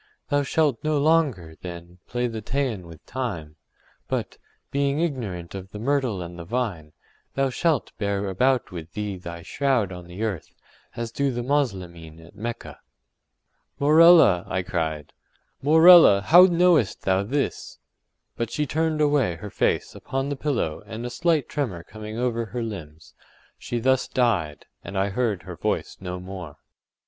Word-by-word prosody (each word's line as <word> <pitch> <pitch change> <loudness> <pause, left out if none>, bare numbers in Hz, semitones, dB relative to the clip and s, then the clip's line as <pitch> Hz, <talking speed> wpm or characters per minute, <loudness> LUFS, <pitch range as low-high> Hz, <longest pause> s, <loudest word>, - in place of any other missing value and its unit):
Thou 145 0 +2
shalt 145 -3 0
no 155 -1 +1
longer, 140 - +1
then, 85 0 -9
play 120 +1 -1
the 115 -2 -4
Teian 115 -6 -2
with 80 -2 -14
time, 95 -12 -5 0.5
but, - - -3 0.3
being 140 +1 0
ignorant 110 - -3
of 95 -1 -7
the 105 - -9
myrtle 120 -5 0
and 85 0 -9
the - - -6
vine, 90 -7 -3 0.4
thou 135 -1 +1
shalt 160 0 0
bear 100 -1 -1
about 125 +7 +1
with 85 -2 -8
thee 105 -2 -3
thy 85 -2 -8
shroud 130 -4 0
on 90 -1 -9
the 90 +5 -6
earth, 100 -8 -4 0.4
as 115 -1 -4
do 140 0 0
the 120 -1 -3
Moslemin 90 - -2
at 80 +1 -15
Mecca.” 115 +3 -6 1.0
“Morella!” 155 - +7
I 95 0 -2
cried, 80 -4 -3 0.5
“Morella! 160 - +8
how 175 - +8
knowest 175 - +3
thou 95 0 +2
this?” 135 +8 -3 0.6
but 115 -2 -2
she 150 +5 -1
turned 155 +1 0
away 145 - +2
her 100 +5 -9
face - - 0
upon 135 +1 -3
the 145 - -2
pillow 130 - -2
and 115 +2 -6
a 120 - -4
slight 165 -2 +1
tremor 110 - -3
coming 110 +2 -8
over 120 -1 -1
her 120 +2 -4
limbs, 80 -8 -8 0.5
she 120 - -4
thus 130 +2 +2
died, 95 - 0 0.2
and 100 - -6
I 95 +1 +1
heard 105 -2 -1
her - - -8
voice - - -2
no 90 -1 -5
more. 90 -5 -8
115 Hz, 155 wpm, -24 LUFS, 90-140 Hz, 1.0 s, Morella